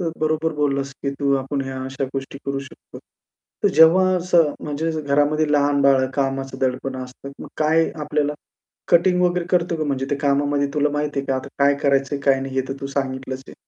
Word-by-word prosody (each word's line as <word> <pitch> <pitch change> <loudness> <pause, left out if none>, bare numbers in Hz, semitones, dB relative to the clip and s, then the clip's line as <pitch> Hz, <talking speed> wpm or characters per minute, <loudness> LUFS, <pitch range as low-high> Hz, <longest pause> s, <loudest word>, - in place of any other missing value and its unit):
तर 170 -2 -1
बरोबर 155 +1 0
बोललास 140 -2 -1
की 140 - -1
तू 140 -1 +2
आपण 135 +1 -3
ह्या 130 0 -5
अशा 135 +1 -3
गोष्टी 135 0 -5
करू 140 0 -1
शकतो. 140 - -13 0.7
तर - - +6
जेव्हा 165 +4 +7
असं 170 -4 +3
म्हणजे 150 +2 -2
घरामध्ये 145 +1 +1
लहान 145 -1 +3
बाळ, 135 -1 +4
कामाचा 135 -1 -2
दडपण 130 +1 -3
असतं. 130 +2 -10
मग - - -9
काय 160 +1 +2
आपल्याला 150 0 0 0.6
कटिंग 180 +1 +4
वगैरे 180 -1 +1
करतो 175 -2 +1
का 155 - -2
म्हणजे 135 -2 -2
ते 145 - +1
कामामध्ये 145 0 +1
तुला 150 0 +2
माहिती 150 -1 -2
आहे 135 - -10
का? 135 - 0
आता 130 +1 -6
काय 140 0 +4
करायचंय, 140 0 +1
काय 135 -1 +4
नाही 135 0 -5
हे 130 - +2
तर 135 - -3
तू 135 - -4
सांगितलंच 130 -1 -4
आहे. - - -11
140 Hz, 195 wpm, -21 LUFS, 135-155 Hz, 0.7 s, जेव्हा